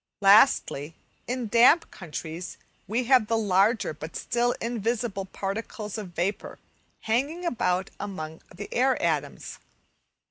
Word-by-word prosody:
Lastly, 195 - +4 0.3
in 250 -1 -2
damp 235 +10 +5
countries 165 0 -7 0.3
we 230 +5 0
have 245 -3 +4
the 225 - +1
larger 205 -1 +2
but 155 +2 -9
still 240 0 0
invisible 230 -3 -2
particles 210 +2 -5
of 195 -6 -7
vapour 185 +5 -2 0.4
hanging 280 +11 -1
about 190 - 0
among 160 -6 -6
the 205 +3 -8
air 260 +2 +2
atoms. - - -2
210 Hz, 115 wpm, -26 LUFS, 185-240 Hz, 0.4 s, damp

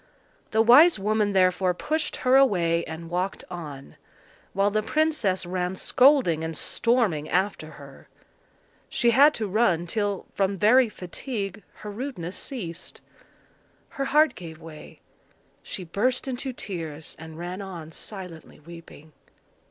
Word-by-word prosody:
The 220 0 +3
wise 290 +9 +7
woman 210 0 0
therefore 185 -1 +2
pushed 310 - -2
her 255 +1 +5
away, 175 -11 +3
and 160 +1 -7
walked 180 +3 -3
on; 150 -6 -8 0.5
while 200 +1 +1
the 215 +1 +1
princess 235 - 0
ran 180 +1 -2
scolding 250 - +3
and 160 -1 -4
storming 215 - 0
after 180 -4 -1
her. 140 -2 -14 0.8
She 240 -1 +2
had 285 +5 +6
to 220 - -3
run 190 -5 +1
till, 205 +1 -2
from 195 0 0
very 235 +5 +5
fatigue, 200 +1 -6 0.2
her 210 - -4
rudeness 205 -6 -5
ceased. 180 -11 -6 0.9
Her 275 - -4
heart 305 +3 +4
gave 160 -3 -10
way; 160 -2 -12 0.6
she 185 - -6
burst 240 +11 -1
into 260 +1 -3
tears, 165 -9 -7
and 160 0 -10
ran 175 +3 -6
on 170 -5 -8
silently 180 -4 -8
weeping. 160 -1 -14
190 Hz, 130 wpm, -25 LUFS, 170-235 Hz, 0.9 s, wise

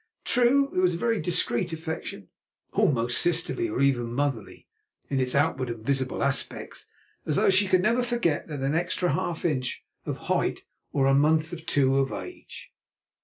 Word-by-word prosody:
True, 250 +3 +3
it - - +2
was 180 -2 +2
a - - -3
very 230 +3 0
discreet 175 0 0
affection, 160 - -6 0.4
almost 120 -3 +3
sisterly, 175 - +2
or - - -2
even 120 -4 +1
motherly, 135 -6 -3 0.4
in 135 - +1
its 130 0 +1
outward 140 -3 +1
and 115 -2 -7
visible 135 -1 0
aspects, 140 0 -2 0.4
as 150 - 0
though 140 - +4
she 190 +1 +4
could 185 -1 +3
never 235 +5 +2
forget 240 -11 -1
that 145 -4 -5
extra 175 +1 0
half 175 -3 -3
inch 130 -7 -2 0.2
of - - -3
height - - -1 0.3
or 135 -1 +2
month 155 +3 +2
or - - -4
two 140 -5 +1
of 135 0 0
age. 360 - -9
155 Hz, 165 wpm, -26 LUFS, 135-180 Hz, 0.4 s, though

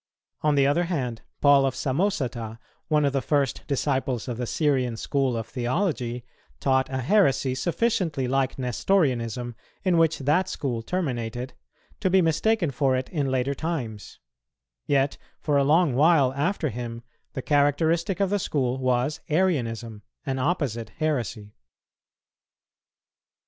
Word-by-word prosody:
On 150 -1 +2
the 140 -1 +4
other 145 +5 +2
hand, 130 -10 -3 0.2
Paul 140 -1 +6
of 135 -1 0
Samosata, 130 - -1 0.3
one 150 -2 +2
of 140 - +1
the 135 - +1
first 140 -3 0
disciples 135 -4 -1
of 120 -2 -4
the 125 - -2
Syrian 130 -6 0
school 135 -1 0
of 115 - -3
theology, 125 - -2 0.3
taught 130 -1 +2
a 130 0 -2
heresy 135 - +3
sufficiently 170 - 0
like 135 0 0
Nestorianism, 125 - 0 0.3
in 180 -4 +3
which 165 -1 +3
that 150 +7 +1
school 125 -9 -3
terminated, 125 -5 -3 0.5
to 185 - +1
be 190 +1 +5
mistaken 170 +1 +2
for 135 0 +1
it 130 0 -3
in 145 -5 -1
later 130 +1 0
times; 130 -9 -5 0.7
yet 140 -1 +1 0.2
for 150 - 0
a 140 - +4
long 155 +1 +3
while 140 -1 +4
after 155 +3 0
him 115 0 -6 0.3
the 130 - -5
characteristic 160 +5 +2
of 195 -1 +1
the 205 - +2
school 130 -7 -1
was 130 +3 0
Arianism, 120 - 0 0.2
an 135 -2 -2
opposite 130 - -1
heresy. 120 -9 -2
135 Hz, 140 wpm, -25 LUFS, 125-160 Hz, 0.7 s, Paul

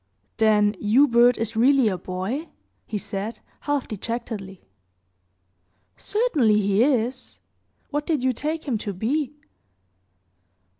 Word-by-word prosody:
"Then 210 -2 +4
Hubert 240 +2 +4
is 225 0 -3
really 260 +2 +4
a 195 - +1
boy?" 190 - -4 0.4
he 215 - -3
said, 205 +2 -4 0.2
half 290 -2 -2
dejectedly. 215 -3 -6 1.3
"Certainly 305 - +1
he 200 +1 +2
is. 255 -2 -1 0.5
What 295 0 -2
did 305 -6 0
you 260 0 +2
take 310 +6 -3
him 235 -6 0
to 205 -1 -4
be?" 270 - -2
230 Hz, 110 wpm, -24 LUFS, 210-280 Hz, 1.3 s, Then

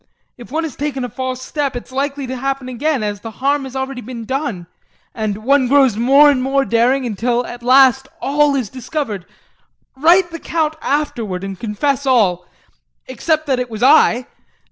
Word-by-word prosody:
If 245 0 -13
one 320 +3 -1
has 315 -6 -5
taken 275 -3 -3
a - - -6
false 255 +1 -4
step 280 -1 -2
it's 245 - -7
likely 280 +1 -2
to 260 +1 -5
happen 270 0 -3
again 260 0 -1
as 205 -1 -3
the 225 - -8
harm 280 +1 0
has 265 0 -9
already 265 -1 -4
been 235 -1 -8
done, 260 - -3 0.5
and 215 -1 -3
one 270 +1 +3
grows 270 -4 +4
more 275 +6 +6
and 260 -3 0
more 270 +1 +1
daring 250 +3 +2
until 240 +2 -1
at 240 +1 -8
last 265 +1 +5
all 290 0 +2
is 255 -5 -1
discovered. 245 - -5 0.7
Write 345 +6 +4
the 330 - -7
Count 315 -1 -1
afterward 230 -10 -2
and 195 -1 -6
confess 265 +5 -1
all 190 -9 +2 0.6
except 310 +5 -1
that 265 -4 0
it 250 -1 -3
was 220 0 -5
I. 255 -3 +5
260 Hz, 180 wpm, -18 LUFS, 235-280 Hz, 0.7 s, more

